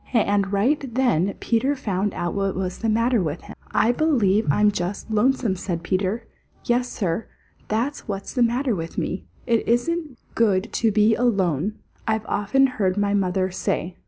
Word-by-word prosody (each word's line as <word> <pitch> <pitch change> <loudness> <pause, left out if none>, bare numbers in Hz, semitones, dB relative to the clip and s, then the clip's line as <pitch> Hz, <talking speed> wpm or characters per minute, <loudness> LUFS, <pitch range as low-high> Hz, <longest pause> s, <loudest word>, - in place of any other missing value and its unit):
And 205 -4 +2
right 245 +5 0
then 225 -8 +2
Peter 260 +5 +1
found 205 -5 -2
out 175 0 -2
what 195 -1 -1
was 185 -1 -3
the 225 - 0
matter 230 +1 +2
with 155 -1 -3
him. - - -11
"I 230 - +3
believe 235 - +2
I'm 210 +8 +4
just 195 +3 -4
lonesome," 225 -1 +2
said 175 -2 -4
Peter. 190 +6 -1 0.4
"Yes, 245 +1 +1
Sir, 190 +1 -2 0.4
that's 235 +7 -2
what's 195 -2 -5
the 250 - 0
matter 240 +2 +2
with 165 -3 -5
me. 185 - -2 0.2
"It 230 -2 +1
isn't 295 +4 0 0.2
good 210 -2 +1
to 225 -2 +2
be 215 +1 +4
alone, 200 - +1 0.3
I've 220 -1 0
often 210 +8 +2
heard 200 -7 0
my 205 0 +1
mother 185 -1 +1
say. 175 0 -2
210 Hz, 165 wpm, -23 LUFS, 190-240 Hz, 0.4 s, I'm